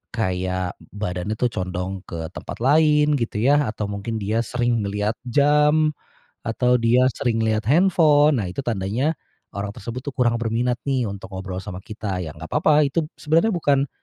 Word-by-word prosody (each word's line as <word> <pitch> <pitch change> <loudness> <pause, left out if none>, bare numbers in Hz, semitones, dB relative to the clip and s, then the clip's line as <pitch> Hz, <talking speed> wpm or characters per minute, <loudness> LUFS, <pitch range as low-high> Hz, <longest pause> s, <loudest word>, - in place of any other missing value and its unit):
kayak 95 -3 -2 0.2
badannya 100 +1 -3
tuh 120 +1 0
condong 95 0 -3
ke 80 -1 -6
tempat 115 - -7
lain 150 0 +4
gitu 115 -3 -3
ya, 145 +1 +4
atau 105 -2 -4
mungkin 100 +3 -4
dia 110 +2 -1
sering 120 -1 0
ngelihat 105 +2 -2
jam, 150 +3 +3 0.5
atau 125 +2 +1
dia 125 +2 +4
sering 115 -2 0
ngelihat 110 -1 +1
handphone. 150 - +4
Nah 90 - -4
itu - - -7
tandanya 120 +5 -1 0.4
orang 100 0 -3
tersebut 115 +5 -7
tuh 145 - -4
kurang 125 -3 +1
berminat 115 +2 0
nih 130 -4 0
untuk 100 +1 -8
ngobrol 95 0 -5
sama 95 -3 -7
kita, 105 -3 -5
ya 80 -4 -6
gak - - -10
papa, 150 -1 +4
itu 150 +3 0
sebenarnya 165 +7 +2
bukan 140 -4 +2
115 Hz, 165 wpm, -22 LUFS, 100-145 Hz, 0.5 s, lain